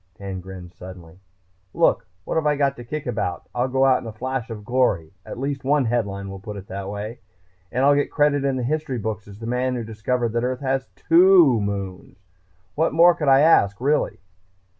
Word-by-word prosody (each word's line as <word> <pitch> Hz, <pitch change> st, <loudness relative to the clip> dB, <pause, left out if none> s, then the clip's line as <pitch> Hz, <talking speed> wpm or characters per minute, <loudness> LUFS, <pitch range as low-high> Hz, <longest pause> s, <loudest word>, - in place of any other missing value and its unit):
Dan 95 Hz, -2 st, -6 dB
grinned 90 Hz, -1 st, -10 dB
suddenly. 90 Hz, -1 st, -12 dB, 0.6 s
"Look, -, -, +2 dB, 0.2 s
what -, -, -3 dB
have 160 Hz, -2 st, +1 dB
I 150 Hz, -, +3 dB
got 140 Hz, -1 st, +1 dB
to 120 Hz, -, -8 dB
kick 150 Hz, +5 st, -5 dB
about? 90 Hz, -7 st, -3 dB
I'll 125 Hz, +1 st, 0 dB
go 130 Hz, +1 st, +2 dB
out 130 Hz, -1 st, +3 dB
in -, -, -9 dB
a -, -, -5 dB
flash 130 Hz, +2 st, -4 dB
of 105 Hz, -2 st, -8 dB
glory 105 Hz, -10 st, +1 dB, 0.2 s
at -, -, -7 dB
least 135 Hz, +1 st, -3 dB
one 140 Hz, 0 st, +2 dB
headline 100 Hz, -4 st, -2 dB
will 95 Hz, 0 st, -7 dB
put 105 Hz, 0 st, -8 dB
it 95 Hz, -, -9 dB
that 95 Hz, 0 st, -5 dB
way 105 Hz, +3 st, -6 dB, 0.5 s
and 130 Hz, +2 st, +1 dB
I'll 145 Hz, -, +6 dB
get 145 Hz, 0 st, +1 dB
credit 145 Hz, -2 st, +2 dB
in 135 Hz, -1 st, 0 dB
the 130 Hz, -, -2 dB
history 150 Hz, 0 st, -2 dB
books 110 Hz, -1 st, -4 dB
as 100 Hz, 0 st, -12 dB
the 115 Hz, -, -8 dB
man 125 Hz, +2 st, -1 dB
who 120 Hz, -, -3 dB
discovered 115 Hz, +2 st, -2 dB
that 115 Hz, 0 st, 0 dB
Earth 125 Hz, +1 st, -2 dB
has 135 Hz, -1 st, -1 dB
two 170 Hz, -, +5 dB
moons! 100 Hz, -2 st, -5 dB, 0.6 s
What 160 Hz, +2 st, 0 dB
more 170 Hz, +2 st, +6 dB
could 150 Hz, -3 st, -4 dB
I 135 Hz, 0 st, +6 dB
ask, 100 Hz, -11 st, +4 dB
really?" 145 Hz, +4 st, 0 dB
125 Hz, 210 wpm, -22 LUFS, 100-140 Hz, 0.6 s, I'll